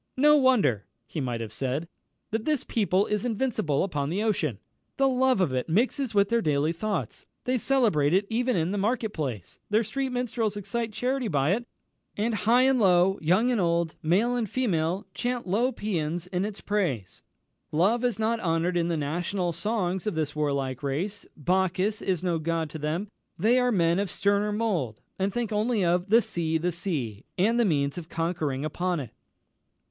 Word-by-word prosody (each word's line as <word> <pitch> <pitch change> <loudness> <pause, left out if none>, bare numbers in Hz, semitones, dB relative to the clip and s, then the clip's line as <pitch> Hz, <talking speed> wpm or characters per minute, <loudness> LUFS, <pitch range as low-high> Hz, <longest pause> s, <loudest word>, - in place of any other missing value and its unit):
"No 300 +3 +6
wonder," 245 - +3 0.2
he 145 +6 -5
might 120 -3 -2
have 110 -1 -6
said, 135 +7 -2 0.4
"that 220 0 -1
this 300 -1 0
people 200 -3 +1
is 210 -1 -1
invincible 225 - 0
upon 145 -7 -2
the 195 +6 -1
ocean. 165 - 0 0.4
The 270 - +4
love 260 -3 +2
of 175 -8 +1
it 130 +4 -2
mixes 235 - +1
with 200 0 +4
their 235 0 +2
daily 150 -1 +1
thoughts; 170 - -3 0.2
they 255 0 0
celebrate 215 - +2
it 190 +3 +3
even 245 +2 0
in 170 +1 0
the 205 - -1
market 220 +1 0
place; 125 - -5
their 215 +2 +3
street 265 +5 -2
minstrels 235 -4 -1
excite 220 +3 -3
charity 250 +3 -1
by 145 -4 +1
it; 240 +3 -3 0.5
and 225 +3 0
high 235 +4 +3
and 265 -1 +3
low, 190 -1 +4
young 185 +10 +3
and 235 -5 +1
old, 170 -1 +1
male 205 +10 +2
and 230 -4 -1
female, 185 -5 0
chant 245 0 -2
lo 225 +8 +1
pæans 175 -6 -2
in 180 +1 0
its 210 -1 -6
praise. 160 - -2 0.5
Love 200 +10 +2
is 245 -5 +1
not 225 +1 0
honoured 170 0 0
in 170 -1 +1
the 170 -2 0
national 175 +4 -1
songs 190 0 -1
of 210 - -1
this 155 -2 -2
warlike 140 -4 -1
race 170 +9 -3
Bacchus 185 +5 0
is 185 -3 -1
no 175 -3 0
god 165 -1 -2
to 155 - -6
them; 155 +7 -2 0.3
they 225 +8 +3
are 250 0 +2
men 170 -3 +2
of 200 -1 -1
sterner 205 +3 +1
mould, 190 - -1 0.2
and 195 +1 +1
think 235 0 -2
only 215 -1 +1
of 175 +3 +1
'the 230 +2 +6
Sea, 160 -3 -1
the 175 +3 -1
Sea!' 145 - -3
and 225 +6 +3
the 235 - +4
means 145 -3 0
of 165 -1 -11
conquering 160 -5 -2
upon 175 +2 -1
it." 125 -6 -7
190 Hz, 185 wpm, -27 LUFS, 160-225 Hz, 0.5 s, No